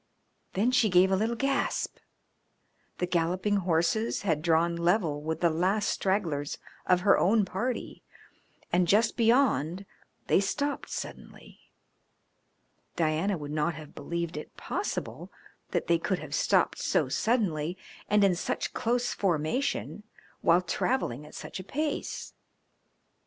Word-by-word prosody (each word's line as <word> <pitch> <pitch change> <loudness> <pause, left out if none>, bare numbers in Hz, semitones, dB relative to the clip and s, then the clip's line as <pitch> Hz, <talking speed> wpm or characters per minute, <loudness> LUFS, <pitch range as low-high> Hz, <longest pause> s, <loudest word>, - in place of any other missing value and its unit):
Then 220 +6 +2
she 250 -4 +3
gave 185 +1 +5
a - - +4
little 220 +4 0
gasp. 275 +3 -1 1.0
The 180 - 0
galloping 180 +4 +1
horses 185 +6 +1
had 160 -6 +1
drawn 170 +1 +2
level 170 -3 +1
with 160 +1 -3
the 170 -2 +4
last 190 +6 +1
stragglers 165 -8 -1 0.3
of 180 -1 +4
her 200 - +5
own 210 +2 +3
party, 230 +7 -3 0.7
and 175 0 +3
just 215 +5 +3
beyond 225 - +2 0.4
they - - +4
stopped 285 +8 -2
suddenly. - - -8 1.4
Diana 165 +4 +1
would 145 -1 -6
not 155 +2 0
have 155 -1 -10
believed 170 -2 -4
it 150 - -9
possible - - -4 0.4
that - - -1
they 170 -1 +2
could 190 +2 -1
have - - -8
stopped - - +2
so - - +1
suddenly 185 -8 0 0.3
and 210 0 +4
in 195 -2 +5
such 175 - -3
close 245 +1 0
formation 195 - -1 0.4
while 175 +2 +4
travelling 150 - -1
at - - -13
such - - -7
a - - -6
pace. 295 - -3
185 Hz, 130 wpm, -29 LUFS, 165-215 Hz, 1.4 s, gave